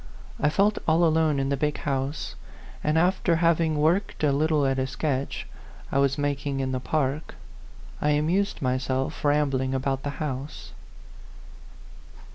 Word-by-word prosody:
I 150 - +3
felt 200 +7 +2
all 165 +2 +4
alone 160 -2 +3
in 135 0 0
the 140 - +1
big 150 +1 0
house, 135 0 -2 0.5
and 150 +1 +2
after 175 0 +2
hav 165 0 +3
ing 160 -2 +1
worked 165 +5 +1
a 145 - +4
little 150 +1 +2
at 135 0 +1
a 130 - 0
sketch 135 0 -2 0.5
I 135 - +2
was 140 0 +2
mak 145 -1 -1
ing 135 -1 -1
in 130 -1 -1
the 130 - -1
park, 145 +2 -2 0.7
I 150 - +2
amused 160 +6 +1
myself 130 +3 -1
rambling 140 -3 +1
about 135 0 -1
the 145 - -3
house. 145 -1 -5
145 Hz, 155 wpm, -26 LUFS, 135-160 Hz, 0.7 s, all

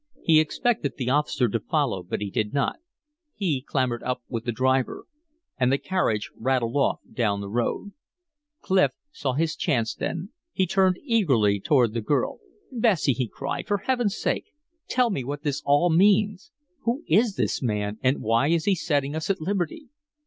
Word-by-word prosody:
He 160 -2 +6
expected 155 - 0
the 125 -1 -1
officer 145 -3 +2
to 115 +1 -1
follow, 135 - 0
but 90 +3 -4
he 100 -1 -3
did 105 +6 -1
not; 140 - 0 0.6
he 160 -10 -1
clambered 130 -3 -1
up 125 0 -3
with 115 -2 -4
the 120 - 0
driver. 130 +2 0 0.5
And 125 0 +3
the 135 - +3
carriage 115 - -1
rattled 125 -2 0
off 140 - +1
down 105 -4 0
the 100 - -5
road. 120 - -2 0.7
Clif 190 -1 +3 0.2
saw 135 - -2
his 160 +3 0
chance 120 -9 0
then. 175 +3 -4 0.2
He 190 - +2
turned 185 0 +2
eagerly 135 - +2
toward 120 0 +3
the 115 - -1
girl. 105 - 0 0.3
"Bessie!" 220 - +2
he 125 0 -2
cried, 140 +5 -5
"for 205 - +1
Heaven's 240 -1 0
sake, - - -1 0.4
tell 250 -2 +2
me 140 -9 -2
what 145 +3 -5
this 145 -3 -1
all 145 +5 +4
means. 200 +2 +3 0.3
Who 245 +4 -2
is 210 +4 +3
this - - -1
man? 105 -3 -2
And 130 +1 +1
why 115 +5 +2
is 165 0 +1
he 200 - +4
setting 145 -4 -1
us 160 +3 -3
at 195 -1 +1
liberty?" 195 - -3
145 Hz, 175 wpm, -25 LUFS, 120-190 Hz, 0.7 s, He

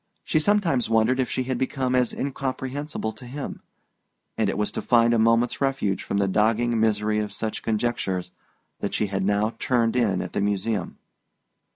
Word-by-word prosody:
She 155 - +1
sometimes 165 - +2
wondered 115 +3 +3
if 130 - +1
she 130 - -1
had 130 -1 -2
become 130 -1 -1
as 125 -1 +2
incomprehensible 135 -1 -3
to 125 - -13
him; 140 +3 -6 0.7
and - - +1
it - - -2
was 105 0 0
to - - -4
find 120 -1 +4
a 115 - +3
moment's 115 +3 +2
refuge 135 -8 0
from 100 - -2
the 100 -1 +2
dogging 115 +4 +2
misery 105 -1 +2
of 105 -1 -3
such 110 +2 -4
conjectures 105 -5 -1 0.5
that - - -2
she 105 - +1
had 95 -1 -2
now 105 +3 +1
turned 120 -2 +1
in 110 -7 +1
at - - -8
the - - 0
Museum. 105 +1 -1
115 Hz, 180 wpm, -25 LUFS, 105-130 Hz, 0.7 s, find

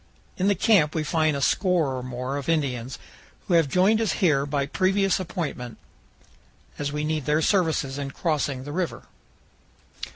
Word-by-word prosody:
In 190 - 0
the 200 - +3
camp 180 -6 +3
we 160 - 0
find 155 -1 +1
a - - -4
score 175 -8 +1
or 130 - -4
more 125 +2 -4
of 140 +2 -5
Indians, 130 -6 -1 0.5
who - - 0
have 165 -3 +4
joined 195 +8 +3
us 220 - +1
here 145 -6 +2
by 140 -1 -1
previous 195 +5 +1
appointment, 150 -9 -5 1.0
as 145 -1 -2
we 150 0 -3
need 155 -2 -2
their 150 +1 +2
services 160 -8 +1
in 140 -1 -4
crossing 140 -4 -2
the 145 - -7
river. 175 +2 -3
150 Hz, 165 wpm, -25 LUFS, 140-180 Hz, 1.0 s, have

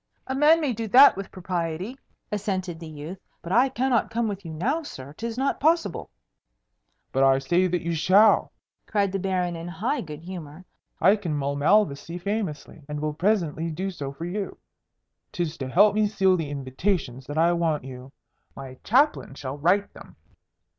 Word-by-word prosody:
"A 265 - -3
man 300 +4 +5
may 290 -6 0
do 225 0 -4
that 260 +7 +8
with 195 0 -7
propriety," 180 +4 -3 0.4
assented 190 -5 -3
the 165 - -8
youth. 155 +4 -8 0.2
"But 170 - -6
I 245 +6 +4
cannot 255 -3 +1
come 230 0 -1
with 200 -2 -5
you 165 - -7
now, 245 - -1
sir. 140 - -9
'Tis 230 +7 -5
not 270 +2 0
possible." 310 - +1 1.0
"But 135 - 0
I 135 0 +5
say 175 +7 +2
that 180 -1 -1
you 170 0 -1
shall!" 195 +7 +4 0.4
cried 200 -2 +1
the 195 - -2
Baron 180 -2 -1
in 165 +1 -7
high 205 - -2
good 155 -1 -9
humour. 175 -2 -9 0.3
"I 195 +3 +5
can 175 -7 -3
mull 140 0 -1
Malvoisie 165 0 +2
famously, 180 -6 -4
and 150 0 -4
will 150 0 -2
presently 165 -2 0
do 185 +5 -3
so 140 -6 -6
for 160 +4 -7
you. 195 +3 -4 0.7
'Tis 170 -3 -3
to 135 - -3
help 200 +8 +5
me 215 0 +2
seal 190 -2 +3
the 160 -5 -3
invitations 135 -1 -2
that 145 +2 -5
I 170 +2 +4
want 165 -4 0
you. 130 0 -10 0.4
My 130 -1 -9
Chaplain 265 - +2
shall 140 +1 -6
write 190 +6 +2
them. - - -14
180 Hz, 180 wpm, -25 LUFS, 150-210 Hz, 1.0 s, that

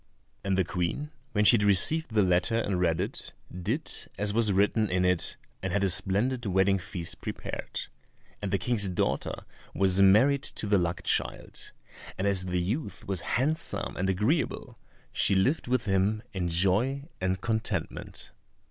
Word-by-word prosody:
And 95 -1 0
the 95 - +3
Queen, 90 - -3 0.2
when 105 0 +2
she 120 - +7
had 105 - -1
received 110 - +6
the 105 - +4
letter 90 +5 +1
and 100 -5 -1
read 80 -2 +1
it, - - -5 0.2
did 110 - -3 0.3
as 105 0 0
was 110 -2 +3
written 105 +2 +2
in 90 0 +1
it, 90 -2 +1 0.2
and 95 - -3
had 100 +1 0
a 95 - +4
splendid 110 +7 0
wedding 95 +1 +2
feast 85 -1 -7
prepared, - - -5 0.6
and 100 - -3
the 100 - +1
King's 100 +1 0
daughter 90 - -2 0.3
was 95 0 +3
married 120 +9 +5
to 125 - -5
the 100 -1 +3
luck 85 0 -2
child, - - -2 0.5
and 95 - -2
as 95 -2 +3
the 90 0 -1
youth 105 - -4
was 95 -3 -2 0.2
handsome 150 +6 -1
and 95 +1 -1
agreeable 105 - -1 0.3
she 100 - +2
lived 125 +12 +1
with 125 -1 0
him 100 +2 0
in 90 -3 -2
joy 100 +11 +1 0.2
and 95 0 -1
contentment. 110 -1 -4
100 Hz, 165 wpm, -28 LUFS, 95-115 Hz, 0.6 s, she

